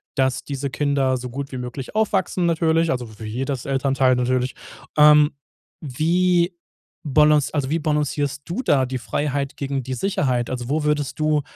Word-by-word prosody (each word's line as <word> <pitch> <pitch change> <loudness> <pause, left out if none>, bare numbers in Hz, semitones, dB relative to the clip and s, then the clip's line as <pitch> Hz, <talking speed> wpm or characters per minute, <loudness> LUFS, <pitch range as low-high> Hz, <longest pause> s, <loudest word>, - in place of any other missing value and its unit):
dass 130 -1 +1
diese 140 -1 -4
Kinder 140 -2 +1
so 125 0 -6
gut 140 +3 -6
wie 130 - -5
möglich 125 - -7
aufwachsen, 190 -4 +1
natürlich, 165 -1 +2
also 125 -3 -3
w - - -8
wie - - -5
jedes 130 +3 -3
Elternteil 135 -1 +2
natürlich. 125 +1 0 0.4
Ähm, 150 0 +7 0.5
wie 170 +5 +1 0.5
balanc 150 0 +4
also 140 -4 -1
wie 165 - +1
balancierst 145 -2 -1
du 175 +9 -3
da 135 - +3
die 130 0 -4
Freiheit 140 +1 -2
gegen 140 -1 -2
die 130 +1 -4
Sicherheit? 130 -7 0
Also 125 -1 -4
wo 150 +2 0
würdest 150 -2 -1
du, 155 -1 +2
140 Hz, 165 wpm, -22 LUFS, 130-155 Hz, 0.5 s, Ähm